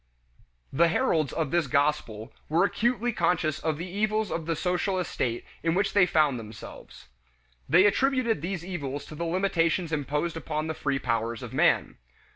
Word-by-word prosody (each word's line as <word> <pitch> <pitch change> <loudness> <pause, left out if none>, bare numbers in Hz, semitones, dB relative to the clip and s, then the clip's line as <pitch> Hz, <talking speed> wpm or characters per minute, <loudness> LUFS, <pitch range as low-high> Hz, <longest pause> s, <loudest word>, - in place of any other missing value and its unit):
The 170 +5 +4
heralds 165 - +1
of 160 -4 -2
this 170 -4 +1
gospel 135 -5 0 0.2
were 165 +4 +3
acutely 240 +2 0
conscious 165 -5 +1
of 160 -2 -1
the 170 +3 -5
evils 215 +2 -1
of 165 -1 -3
the 165 - 0
social 180 +3 0
estate 125 -9 -2 0.2
in 165 0 +1
which 195 +1 +1
they 190 -4 +5
found 150 -6 +2
themselves. 110 -1 -11 0.6
They 175 +7 +6
attributed 255 - +2
these 175 0 -4
evils 145 -6 -4
to - - -11
the 170 +3 -4
limitations 170 -1 +1
imposed 150 +3 -1
upon 155 -1 -3
the 160 - -2
free 135 -2 -1
powers 115 -2 -2
of - - -8
man. - - +2
165 Hz, 165 wpm, -27 LUFS, 145-185 Hz, 0.6 s, They